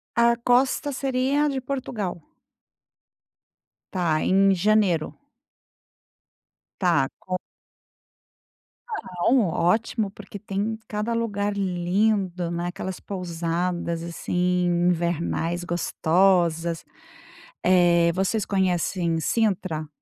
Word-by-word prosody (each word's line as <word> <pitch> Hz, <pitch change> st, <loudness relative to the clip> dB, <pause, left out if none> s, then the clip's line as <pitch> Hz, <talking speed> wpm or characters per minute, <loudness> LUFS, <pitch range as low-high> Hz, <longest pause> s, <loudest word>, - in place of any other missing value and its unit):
A 235 Hz, 0 st, +4 dB
costa 255 Hz, +4 st, +2 dB
seria 270 Hz, +2 st, +1 dB
de 270 Hz, -2 st, -2 dB
Portugal? 235 Hz, -10 st, -4 dB, 1.7 s
Tá, 170 Hz, -4 st, +1 dB
em 195 Hz, +1 st, +4 dB
janeiro? 190 Hz, -4 st, +2 dB, 1.7 s
Tá, 170 Hz, -8 st, +2 dB
com 185 Hz, 0 st, -3 dB, 1.6 s
Não. 215 Hz, -, +1 dB
Ótimo, 210 Hz, +6 st, +1 dB
porque 205 Hz, 0 st, -10 dB
tem 205 Hz, +2 st, -3 dB
cada 210 Hz, +2 st, -2 dB
lugar 205 Hz, -3 st, -1 dB
lindo. 185 Hz, -1 st, 0 dB
né. 170 Hz, +1 st, -2 dB
Aquelas 185 Hz, 0 st, -5 dB
pousadas 170 Hz, -2 st, -3 dB
assim 180 Hz, +1 st, 0 dB
invernais 175 Hz, 0 st, 0 dB
gostosas. 170 Hz, -1 st, +1 dB, 0.8 s
Eh, 175 Hz, -2 st, +4 dB
vocês 195 Hz, +4 st, 0 dB
conhecem 180 Hz, -3 st, 0 dB
Cintra? 185 Hz, -5 st, 0 dB
185 Hz, 80 wpm, -24 LUFS, 170-210 Hz, 1.7 s, A